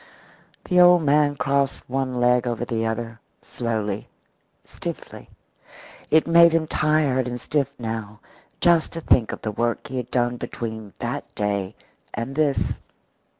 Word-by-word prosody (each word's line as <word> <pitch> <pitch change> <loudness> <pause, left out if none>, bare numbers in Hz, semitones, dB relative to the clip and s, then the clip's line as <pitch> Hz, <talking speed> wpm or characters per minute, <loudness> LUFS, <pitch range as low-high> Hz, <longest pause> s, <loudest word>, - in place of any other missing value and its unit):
The 180 -1 +2
old 175 -1 +7
man 145 0 +3
crossed 140 0 -1
one 130 -1 -2
leg 125 0 +3
over 120 0 -2
the 115 -1 -1
other 115 0 -4 0.2
slowly, 110 -3 -3 0.6
stiffly. - - -8 0.8
It 160 0 +4
made 170 0 +6
him 165 -1 +2
tired 150 -5 +1
and 125 0 -4
stiff 140 0 -1
now 110 -3 -5 0.4
just 170 -2 +3
to 165 - -5
think 120 -7 +3
of - - -8
the 110 - -2
work 120 +2 -2
he 130 - -4
had 125 -2 -4
done 120 -1 0
between 110 -4 -6
that - - -5
day 100 -1 -2 0.4
and 115 +4 -4
this. 150 -2 0
125 Hz, 145 wpm, -23 LUFS, 115-150 Hz, 0.8 s, old